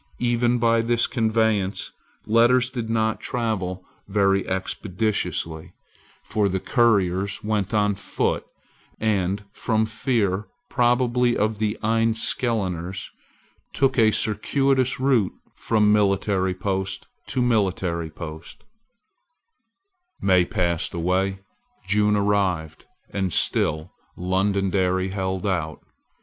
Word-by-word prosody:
Even 120 0 +1
by 115 -1 +3
this 120 0 +1
conveyance 110 -4 0 0.3
letters 120 +3 +4
did 120 -4 -4
not 110 -1 0
travel 95 -7 -3 0.2
very 100 -1 +2
expeditiously: 95 -4 -2 0.5
for 105 -2 0
the 95 +1 -1
couriers 100 -4 +1
went 105 -2 -1
on 105 -2 +2
foot; 100 - -2 0.6
and, 100 -2 0
from 110 0 0
fear 110 -3 -1 0.2
probably 120 -1 +2
of 105 0 0
the 105 -1 -1
Enniskilleners, 110 -5 0 0.6
took 135 -1 +2
a 110 -1 +6
circuitous 130 +5 +1
route 130 -7 +2 0.2
from 105 -2 +2
military 100 -2 +1
post 95 0 -3 0.2
to 120 +4 -2
military 95 -8 0
post, 80 0 -9 1.6
May 90 -2 +3
passed 85 0 -1
away: 95 +3 0 0.4
June 105 +1 +2
arrived; 95 -6 0 0.3
and 95 -2 -1
still 80 +1 +1 0.3
Londonderry 95 0 0
held 95 0 -3
out. 80 -5 -2
105 Hz, 100 wpm, -23 LUFS, 95-115 Hz, 1.6 s, a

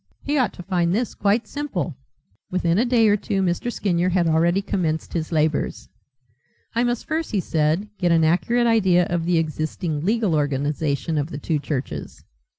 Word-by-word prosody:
He 290 - -1
ought 255 -8 +2
to 180 - -9
find 175 -1 +1
this 235 +1 -1
quite 210 +3 +1
simple." 210 - -3 0.5
Within 180 0 +1
a 240 - +3
day 240 -3 +4
or 205 - +5
two 195 -1 -1
Mr. 180 +7 -1
Skinyer 180 -5 0
had 180 -1 +2
already 170 +4 +2
commenced 160 -5 -2
his 160 -1 -3
labours. 155 -2 0 0.8
"I 235 +1 +1
must 240 -1 -1
first," 320 0 -2
he 210 - 0
said, 160 +3 0
"get 175 -2 +2
an 165 -1 +4
accurate 230 +9 +2
idea 190 -6 +4
of 170 -1 0
the 175 -1 +2
existing 155 0 -2
legal 215 -1 +1
organization 145 +1 0
of 145 +2 -2
the 145 - -6
two 155 +1 -1
churches." 130 - -5
175 Hz, 175 wpm, -23 LUFS, 155-210 Hz, 0.8 s, or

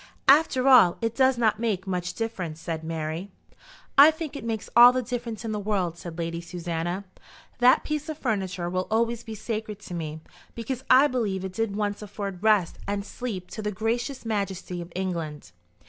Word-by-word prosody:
"After 275 -2 +5
all 240 -10 +7
it 230 -1 -1
does 260 0 +3
not 220 -2 +2
make 210 -5 -1
much 180 -2 -3
difference," 185 -9 -4
said 160 -1 -4
Mary. 160 +3 -4 0.7
"I 290 +2 +11
think 315 -2 -5
it 280 - -6
makes 225 -2 -3
all 240 +1 +10
the 255 0 -1
difference 235 -2 -5
in 225 - -2
the 210 - -2
world," 195 -5 -1
said 170 -1 -9
Lady 170 0 -3
Susanna. 175 +1 -4 0.6
"That 250 +1 +5
piece 305 +1 -3
of 310 - -4
furniture 190 - -2
will 185 +1 -2
always 230 +1 0
be 220 -1 -7
sacred 215 -1 -4
to 180 - -9
me, 160 -2 -4 0.4
because 245 +3 -4
I 260 +3 +8
believe 210 -9 -1
it 190 - -6
did 225 0 -1
once 205 0 -2
afford 200 -3 -6
rest 210 -5 +2
and 200 0 -2
sleep 205 -6 -6
to 220 - -5
the 210 0 -2
gracious 235 +6 -2
majesty 195 -4 -3
of 170 0 -9
England." 165 - -4
210 Hz, 185 wpm, -26 LUFS, 180-235 Hz, 0.7 s, I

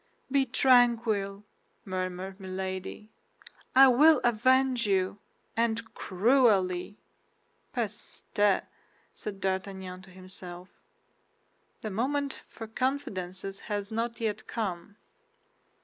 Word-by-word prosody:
"Be 275 -1 +3
tranquil," 230 -6 +3 0.4
murmured 185 +1 -4
Milady; 190 +2 -5 0.6
"I 270 +1 +10
will 295 +4 +6
avenge 250 +1 +3
you—and 220 +4 -2
cruelly!" 200 -3 +2 0.7
"Peste!" 205 -2 0 0.5
said 200 -2 -7
D'Artagnan 190 -1 -3
to 190 - -15
himself, 185 -1 -9 1.1
"the 215 - -4
moment 275 +6 -1
for 225 - -8
confidences 195 -7 -3
has 205 0 -3
not 230 +1 -2
yet 220 -3 -2
come." 200 -3 -4
205 Hz, 85 wpm, -29 LUFS, 190-240 Hz, 1.1 s, I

